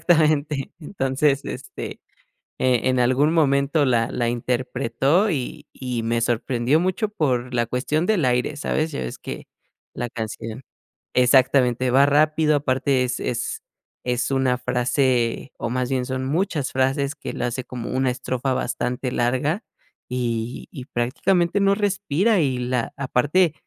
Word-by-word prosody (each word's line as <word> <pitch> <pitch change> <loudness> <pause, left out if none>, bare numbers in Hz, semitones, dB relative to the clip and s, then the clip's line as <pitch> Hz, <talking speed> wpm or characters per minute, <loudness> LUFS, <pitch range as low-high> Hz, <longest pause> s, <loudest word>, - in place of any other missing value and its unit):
Exactamente. 155 -4 +2
Entonces, 140 -3 0
este, - - -7 0.6
eh, 125 -3 +3
en 130 -1 +2
algún 130 +6 +3
momento 145 -1 +3
la 120 -2 +2
la 120 -1 0
interpretó, 125 - +1
y 140 -9 -3
y 125 -3 -3
me 115 +1 0
sorprendió 120 +4 +1
mucho 185 +5 0
por 125 - -1
la 120 -1 +2
cuestión 145 +8 -1
del 195 -9 +2
aire, 125 +3 +1
¿sabes? 155 +1 -1
Ya - - -4
ves 65 - -5
que - - -7 0.5
la 120 -1 -4
canción 110 0 -6 0.5
Exactamente. 125 0 +4
Va 135 +2 +6
rápido, 155 +1 +3
aparte 135 -1 +1
es 125 0 -2
es 115 -2 -3 0.4
es 125 +2 -1
una 130 -2 +2
frase, 125 0 0
o - - -3
más 125 +1 -1
bien 130 -2 0
son 130 0 -3
muchas 155 0 -1
frases, 135 +2 0
que 150 - -6
la - - -2
hace 125 +2 -3
como 120 -2 -6
una 130 0 +1
estrofa 130 +1 -2
bastante 125 0 -2
larga. 130 - 0 0.5
Y 120 -1 -3
y 130 - -8
prácticamente 170 +10 +1
no 200 0 +4
respira, 200 0 +1
y 135 -4 +1
la 125 -1 -2
Aparte 145 +6 +2
130 Hz, 145 wpm, -23 LUFS, 125-150 Hz, 0.6 s, Va